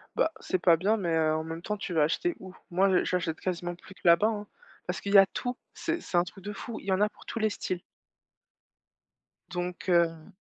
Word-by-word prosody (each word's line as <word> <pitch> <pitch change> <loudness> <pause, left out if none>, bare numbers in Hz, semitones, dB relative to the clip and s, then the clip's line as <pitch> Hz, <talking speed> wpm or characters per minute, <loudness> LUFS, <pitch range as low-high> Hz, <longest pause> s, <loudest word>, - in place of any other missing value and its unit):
Bah, 320 - +2
c'est 185 - -1
pas 170 -2 +5
bien, 205 +6 +2
mais 170 -5 0
heu, 155 -1 +3
en 160 - -1
même 165 +1 -6
temps, 210 +3 -3
tu 180 - -5
vas 155 -2 +4
acheter 345 - 0
où? 185 -1 -10 0.2
Moi, 190 +3 +4
j - - -1
j'achète 170 -3 -1
quasiment 175 -1 -3
plus 185 +2 -14
que - - -22
là-bas, 170 +5 +6
hein. 210 -2 -3 0.4
Parce - - -3
qu'il 200 - -3
y - - +10
a 195 - +9
tout, 245 +4 -4 0.2
c'est 340 0 -2
c'est 175 - -2
un 175 - +5
truc 185 +1 -11
de 205 - -4
fou, 220 +3 -6
il - - -14
y 195 - 0
en 185 - +1
a 210 - +4
pour - - -18
tous 230 - -4
les 215 0 +2
styles. 185 -3 -3 1.7
Donc 180 +1 -4
heu 165 -2 +2
185 Hz, 240 wpm, -29 LUFS, 170-210 Hz, 1.7 s, y